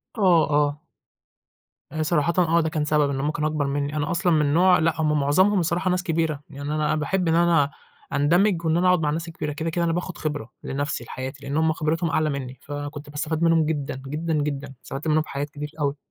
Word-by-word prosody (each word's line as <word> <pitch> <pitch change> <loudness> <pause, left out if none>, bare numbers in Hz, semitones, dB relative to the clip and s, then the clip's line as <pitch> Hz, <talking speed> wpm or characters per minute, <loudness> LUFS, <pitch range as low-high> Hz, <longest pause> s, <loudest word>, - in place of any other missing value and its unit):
آه، 180 -7 +4
آه. 145 0 +2 1.1
آآ 155 0 -1
صراحةً 170 +1 +1
آه، 170 -1 +3
ده 160 - -1
كان 155 -2 -1
سبب 150 -2 +2
إن 135 -1 -2
هُم 150 +2 0
كانوا 155 0 -1
أكبر 150 -2 -1
مِنّي، 145 +1 -2
أنا 150 +2 -1
أصلًا 175 0 +2
من 150 -2 +2
نوع 180 +1 +5
لأ 160 0 +1
هُم 150 -1 +2
معظمهم 185 +8 +3
الصراحة 175 +2 0
ناس 180 0 0
كبيرة، 160 -4 -1
يعني 145 +1 -4
أنا 155 0 +1
باحب 170 +4 0
إن 165 - +3
أنا 165 -4 +3 0.4
أندمج 170 +4 +2
وإن 160 +1 +2
أنا 180 +1 +3
أقعد 180 -2 +4
مع 150 -2 0
الناس 165 +3 -2
الكبيرة 155 -2 -4
كده، 160 +2 -3
كده 170 +1 -1
أنا 165 - +1
باخد 180 +1 -4
خبرة 145 -6 -4
لنفسي 140 -2 -3
لحياتي، 130 +3 -7
لإن 140 +2 -2
هُم 160 0 +3
خبرتهم 165 +1 -1
أعلى 155 -1 +1
مِنّي، 130 -2 -5
فكنت 145 0 -6
باستفاد 155 +2 -2
منهم 165 -2 +4
جدًا، 145 -4 -3
جدًا، 160 +3 -2
جدًا، 145 -2 -2
استفدت 140 +4 -6
منهم 155 0 +3
في - - -9
حاجات 145 +1 -3
كتير 150 0 -7
أوي. 145 0 0
155 Hz, 220 wpm, -24 LUFS, 145-165 Hz, 1.1 s, نوع